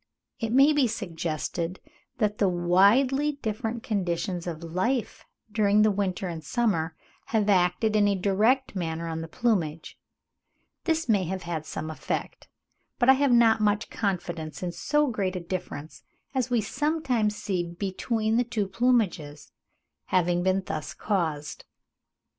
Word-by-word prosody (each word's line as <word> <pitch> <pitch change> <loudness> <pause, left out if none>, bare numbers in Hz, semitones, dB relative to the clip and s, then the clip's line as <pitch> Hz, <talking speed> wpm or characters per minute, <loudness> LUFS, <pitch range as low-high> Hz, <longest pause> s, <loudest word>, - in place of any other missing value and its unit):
It 225 -2 -2
may 275 +5 +6
be 285 -4 +3
suggested 170 -3 -3 0.4
that 210 -2 0
the 200 - +4
widely 205 +12 +3
different 225 -3 -4
conditions 180 -3 -2
of 165 -1 -5
life 190 +9 -2 0.3
during 210 -1 +3
the 215 - +4
winter 190 -2 -1
and 165 -2 -6
summer 170 -10 0 0.3
have 215 -2 +1
acted 190 +3 +2
in 205 -1 +4
a 200 - +2
direct 210 +7 +2
manner 165 -2 -3
on 160 0 -3
the 165 - -6
plumage; 165 -7 -1 0.9
this 325 -3 0
may 205 -5 +2
have 190 +2 -4
had 165 -2 -4
some 155 0 -5
effect, 155 - -4 0.5
but 245 0 +3
I - - +10
have 275 0 +2
not 230 -2 +5
much 210 +1 +1
confidence 175 -6 -3
in 180 - -2
so 295 - +1
great 200 -8 -1
a - - -1
difference 170 -4 -6 0.3
as 255 -2 0
we 240 -2 +2
sometimes 250 -4 0
see 190 -4 -2
between 205 +6 -1
the 245 - +3
two 230 -4 -2
plumages, 190 -9 0 0.5
having 175 -1 +1
been 190 +1 +1
thus 155 - -5
caused. 160 -8 -2
200 Hz, 145 wpm, -27 LUFS, 175-230 Hz, 0.9 s, I